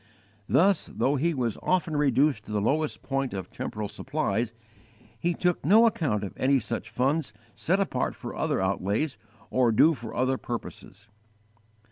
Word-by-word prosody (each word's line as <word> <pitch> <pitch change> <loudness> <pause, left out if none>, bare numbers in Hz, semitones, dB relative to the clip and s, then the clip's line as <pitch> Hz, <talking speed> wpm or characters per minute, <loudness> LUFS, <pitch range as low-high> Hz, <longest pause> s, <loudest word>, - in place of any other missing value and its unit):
_ - - -32 0.5
Thus, 190 0 +3
though 125 +7 0
he 160 +4 +1
was 120 -4 -2
often 175 -4 0
reduced 140 -4 +2
to - - -9
the 105 - 0
lowest 150 +8 0
point 135 -4 -2
of 95 -2 -6
temporal 105 -1 -4
supplies, 110 +3 -2 0.7
he 175 +5 0
took 180 -1 0
no 215 +9 +6
account 145 - +1
of 100 - -5
any 135 +1 +3
such 115 0 -4
funds 130 +2 0 0.2
set 190 +4 +1
apart 195 - -1
for - - -7
other - - 0
outlays 100 +9 -1 0.3
or 125 -2 +3
due 155 +9 +5
for 120 -6 -8
other 130 +1 +1
purposes. 110 -3 -7
130 Hz, 160 wpm, -27 LUFS, 110-155 Hz, 0.7 s, no